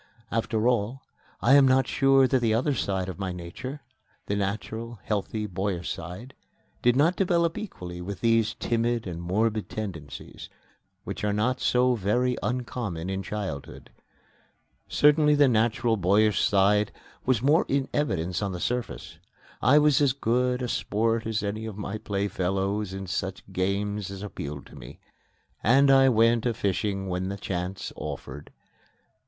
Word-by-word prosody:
After 115 0 0
all, 120 +2 0 0.4
I 130 - +5
am 140 -1 +7
not 130 0 +4
sure 135 -1 +4
that 130 0 +2
the 110 -2 +2
other 135 +5 +1
side 95 -7 -1
of 95 0 -6
my 95 -2 -2
nature 90 - -7 0.4
the 100 - -1
natural, 110 +3 -3
healthy, 105 +1 -2
boyish 95 -2 -3
side 90 +10 -8 0.5
did 120 0 +4
not 160 +7 +3
develop 170 -3 +1
equally 90 - -7
with 95 +1 -6
these 115 -1 +2
timid 120 0 0
and 85 -3 -5
morbid 105 +5 0
tendencies, 80 -10 -7 0.5
which - - -6
are 105 - +1
not 110 +5 0
so 125 0 +3
very 120 +4 +1
uncommon 115 -8 -3
in 95 0 -2
childhood. 95 -9 -6 1.0
Certainly 150 0 +4
the 145 -1 +5
natural, 115 0 +2
boyish 105 +3 +3
side 105 +1 +3 0.3
was 125 -3 +1
more 150 +6 +4
in 135 -1 0
evidence 90 - -1
on 100 -2 -2
the 90 - -5
surface. 90 -9 -4 0.4
I 145 - +5
was 150 -2 +4
as 140 -3 +3
good 125 0 0
a - - -1
sport 115 0 0
as 110 -2 -1
any 110 +2 -3
of 105 -3 -7
my 105 +1 -4
playfellows 100 0 -1
in 95 0 -5
such 95 +1 -3
games 100 +1 -1
as 100 0 -7
appealed 75 -8 -6
to - - -15
me, - - -11 0.7
and 135 +5 +5
I 135 0 +6
went 115 0 +3
a 115 - 0
fishing 100 0 -1
when 90 +1 -2
the 100 - -4
chance 95 0 -4
offered. 75 - -7
110 Hz, 155 wpm, -26 LUFS, 95-125 Hz, 1.0 s, am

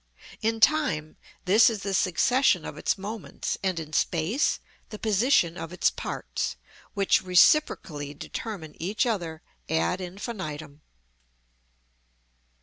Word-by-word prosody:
In 225 +1 0
time, 225 - +2 0.3
this 210 +6 +6
is 215 -4 -5
the 195 0 -2
succession 245 +9 +3
of - - -6
its - - -1
moments, 210 +2 -5
and 185 -3 -1
in 155 -1 -8
space 170 - +1 0.3
the 215 - -7
position 210 -5 +2
of 165 -2 -6
its 180 - +2
parts, - - -4 0.4
which 200 -1 +3
reciprocally 175 - +3
determine 165 -1 -6
each 200 +8 0
other 170 -9 -3 0.3
ad 85 - 0
infinitum. 165 - -6
185 Hz, 115 wpm, -27 LUFS, 160-220 Hz, 0.4 s, this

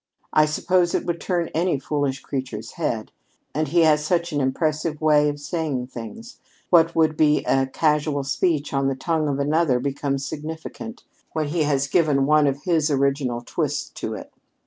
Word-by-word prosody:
I 155 0 +5
suppose 175 +3 +1
it - - -1
would 170 -1 -2
turn 175 -3 -1
any 170 -1 +1
foolish 140 -1 -2
creature's 120 -5 -5
head. 135 -10 -3 0.4
And 155 +2 0
he 170 +4 +3
has 150 -2 +4
such 170 +2 0
an 145 - +1
impressive 155 +3 -1
way 150 -1 +4
of 145 0 -5
saying 145 -4 -2
things! 225 - -9 0.3
What 165 -1 +5
would 160 -1 +3
be 150 -1 +3
a 135 0 +2
casual 150 0 +1
speech 150 +1 0
on 135 0 +1
the 135 - 0
tongue 155 +2 -1
of 140 -2 -1
another 145 -2 +2
becomes 140 +1 -2
significant, 160 - -7 0.3
when 155 -2 -1
he 165 +2 0
has 140 -1 +2
given 145 -3 +2
one 150 0 +4
of 140 +1 -2
his 165 -4 +2
original 135 -3 0
twists - - -2
to - - -3
it. - - -10
150 Hz, 175 wpm, -23 LUFS, 140-160 Hz, 0.4 s, I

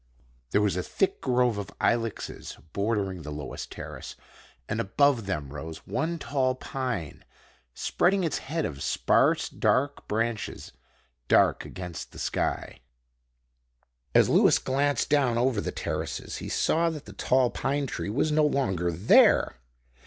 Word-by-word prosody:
There 105 +9 +2
was 100 -4 +1
a 90 - 0
thick 195 - -1
grove 125 -4 +2
of 100 - -8
ilexes 115 -2 -1 0.2
bordering 100 -3 -1
the 75 - -7
lowest 75 -1 -6
terrace, - - -8 0.5
and - - -2
above 125 0 +2
them 75 -8 -3
rose 80 +2 -8
one 170 +2 -1
tall 130 -4 0
pine, 125 - -4 0.5
spreading 190 +1 +1
its 160 -4 -1
head 160 +3 -2
of 70 -3 -5
sparse, - - +2
dark 140 +2 0
branches 115 +1 -2 0.6
dark - - +4
against 90 -3 -7
the - - -12
sky. - - -2 1.4
As - - +6
Lewis - - +5
glanced 140 +2 0
down 135 -5 +2
over 120 -3 +2
the - - -3
terraces - - -4
he - - -6
saw 170 +1 +2
that 155 -3 -7
the 100 - -11
tall 125 +4 +2
pine 140 +2 -1
tree 125 - -4
was 140 +8 +1
no 155 0 +3
longer 95 - +1
there. 85 - +4
120 Hz, 140 wpm, -27 LUFS, 95-140 Hz, 1.4 s, As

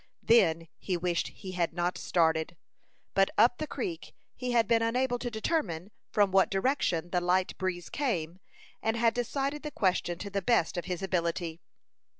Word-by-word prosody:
Then 170 -8 +4
he 185 -3 -1
wished 175 0 0
he 190 - -9
had 175 -2 -1
not 175 0 0
started; 160 -1 +1 0.6
but 195 0 +4
up 240 +3 +5
the 310 - -3
creek 345 -1 -5 0.2
he 250 - -4
had 230 -3 +3
been 230 -1 +3
unable 245 +2 +1
to 245 - -3
determine 215 - -2 0.2
from 205 -2 +3
what 190 0 +4
direction 195 - 0
the 180 - +1
light 180 +1 +1
breeze 180 -2 -2
came, 185 - -2 0.4
and 225 +1 0
had 230 0 +3
decided 275 +4 -2
the 300 - -4
question 185 - 0
to 200 +2 -7
the 200 0 -1
best 190 -4 +2
of 175 - -3
his 180 0 -4
ability. 170 -2 -1
195 Hz, 170 wpm, -30 LUFS, 175-235 Hz, 0.6 s, up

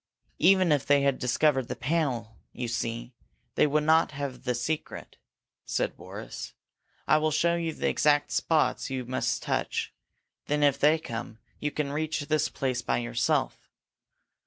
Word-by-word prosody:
"Even 185 -1 +5
if 145 -3 +3
they 140 -1 +4
discovered 130 +1 +1
the - - -4
panel, 125 -7 -1 0.2
you 125 -1 -4
see, 115 +1 -3 0.4
they - - +4
would 150 +1 +1
not 160 0 +3
have 135 -3 -5
the 125 -1 0
secret," 155 +6 -4 0.5
said - - -1
Boris. - - -8 0.5
"I - - +5
will 155 0 +1
show 160 +3 +2
you 165 -1 -1
the - - -2
exact 145 -1 +2
spots 160 -2 +1
you 130 -2 -3
must 130 +2 -1
touch. - - -2 0.5
Then 150 0 +1
if 140 -1 +3
they 150 +3 +5
come, 115 -6 -6 0.2
you 150 - -1
can 145 -1 -3
reach 155 +1 -2
this 155 +1 0
place 130 -3 -2
by - - 0
yourself. 120 0 -1
145 Hz, 155 wpm, -28 LUFS, 125-155 Hz, 0.5 s, Even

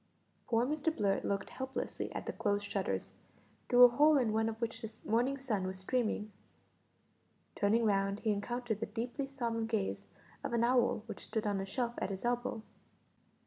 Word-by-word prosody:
Poor 230 0 +3
Mr 305 +3 0
Blurt 200 -9 0
looked 200 0 -2
helplessly 265 0 -4
at - - -4
the - - -3
closed 205 -1 0
shutters, 205 - -2 0.6
through 245 0 +8
a - - +13
hole 295 +5 +5
in 235 -5 +2
one 220 +1 +2
of 225 0 -6
which 230 -1 -3
the 225 -2 -5 0.2
morning 245 +5 +2
sun 215 -9 -1
was 190 0 -4
streaming. 215 +1 -1 1.2
Turning 225 +3 +3
round 195 -1 +1
he 220 - +2
encountered 225 +2 -2
the 225 - -2
deeply 240 +6 -3
solemn 235 -5 -2
gaze 220 -4 -2 0.4
of - - -3
an 235 0 +2
owl 240 -3 +3
which - - -7
stood 220 -1 -2
on 200 -2 0
a - - -3
shelf 235 +3 -1
at - - -1
his 195 +3 -5
elbow. 240 -2 -1
230 Hz, 180 wpm, -34 LUFS, 205-245 Hz, 1.2 s, a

